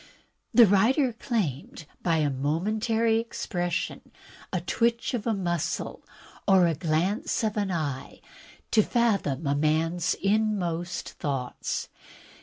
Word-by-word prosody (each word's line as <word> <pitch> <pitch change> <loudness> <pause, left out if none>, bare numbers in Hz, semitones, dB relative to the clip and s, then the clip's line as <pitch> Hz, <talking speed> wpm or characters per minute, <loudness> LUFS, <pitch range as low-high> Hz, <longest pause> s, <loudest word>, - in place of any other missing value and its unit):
The 240 - +8
writer 235 +7 +3
claimed 175 - -3 0.2
by 170 -2 +2
a 150 -2 +1
momentary 215 - +1
expression, 175 -6 -3 0.4
a 185 - 0
twitch 235 +8 0
of 235 -2 -2
a 225 - +2
muscle, 175 -4 -2 0.4
or 190 -3 +6
a 170 - +2
glance 170 - 0
of 215 -1 0
an 205 -2 0
eye, 150 -7 -3 0.5
to 220 - +6
fathom 200 - +1
a 140 - +2
man's 160 +4 +1
inmost 190 -4 -1
thoughts. 135 -4 -3
180 Hz, 115 wpm, -27 LUFS, 160-220 Hz, 0.5 s, The